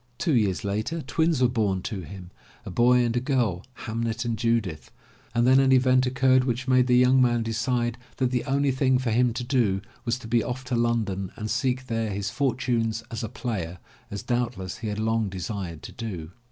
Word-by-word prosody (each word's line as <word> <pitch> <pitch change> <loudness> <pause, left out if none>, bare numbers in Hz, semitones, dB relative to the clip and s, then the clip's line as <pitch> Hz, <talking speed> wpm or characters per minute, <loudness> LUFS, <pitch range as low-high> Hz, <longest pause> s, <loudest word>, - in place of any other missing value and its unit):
Two 160 +3 0
years 105 -7 +1
later 110 +11 -2
twins 160 -5 +1
were - - +6
bom 105 -6 0
to 100 -3 -4
him, 90 +2 -10 0.3
a - - -6
boy 125 +1 +4
and 115 0 -1
a - - +3
girl, 120 - 0 0.2
Hamnet 115 +1 -2
and 115 -1 0
Judith, 110 -8 -1 0.5
and 120 0 +3
then 130 +1 +6
an 135 -1 +4
event 130 0 +4
occurred 130 0 +3
which 125 +1 -2
made 130 -1 +4
the 125 -1 +4
young 125 +1 +5
man 120 -2 +3
decide 120 +2 -1 0.2
that 130 -2 +1
the 125 -2 0
only 140 0 +2
thing 130 0 +2
for 125 -2 -1
him 120 +2 +3
to 125 +2 -3
do 120 -7 +1 0.2
was 120 0 0
to 125 - -10
be 115 +1 +2
off 125 +1 -4
to 125 -1 -2
London 110 -5 0
and 110 -1 -4
seek 130 +2 0
there 115 -2 -1
his 100 0 -3
fortunes 115 -3 0
as 115 -1 -4
a 110 - -3
player, 100 -8 -4 0.3
as 100 - -5
doubtless 120 -6 -2
he 115 - -4
had 105 -1 -3
long 110 -1 0
desired 95 -3 -5
to - - -8
do. 90 -9 -6
120 Hz, 205 wpm, -26 LUFS, 105-125 Hz, 0.5 s, were